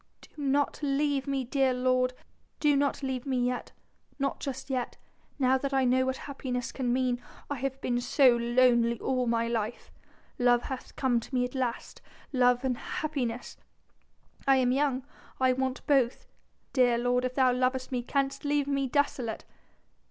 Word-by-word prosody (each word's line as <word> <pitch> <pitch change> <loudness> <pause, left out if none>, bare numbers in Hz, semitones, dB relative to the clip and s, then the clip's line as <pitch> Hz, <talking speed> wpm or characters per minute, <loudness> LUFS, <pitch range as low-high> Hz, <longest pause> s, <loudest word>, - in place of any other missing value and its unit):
Do - - -16
not 280 +1 +1
leave 285 -1 0
me, 275 -1 0
dear 260 +1 +1
lord... 255 0 +2 0.5
do 295 -2 +3
not 280 0 0
leave 265 0 -3
me 265 -2 0
yet... 250 0 -3 0.5
not 275 -1 -1
just 265 0 -5
yet... 250 -2 -2 0.4
now 260 -1 +3
that 275 0 -2
I 265 -1 +3
know 260 +1 +3
what 260 0 -1
happiness 255 -3 -4
can 250 -3 -1
mean. 250 -1 0 0.3
I 285 - -1
have 270 +1 -3
been 245 0 0
so 250 0 +5
lonely 235 -1 +3
all 255 -2 0
my 230 0 +1
life.... 230 -1 -3 0.5
Love 245 -1 +4
hath 265 -2 -7
come 250 -3 +2
to 245 +3 -7
me 250 0 +2
at 250 - -7
last... 255 -3 -3 0.3
love 250 -1 +3
and 250 -2 -1
happiness.... 250 -6 -3 0.9
I 270 - +6
am 255 -1 +3
young 270 -1 +1 0.3
I 260 -1 +4
want 260 0 -2
both.... 265 -4 +2 0.5
Dear 245 -2 +4
lord, 245 +1 +1
if 255 0 -2
thou 255 -2 +4
lovest 255 +1 0
me 250 -2 -1
canst 275 +2 -1
leave 290 -1 +1
me 275 -1 0
desolate?..." 260 -4 -1
255 Hz, 165 wpm, -29 LUFS, 245-275 Hz, 0.9 s, I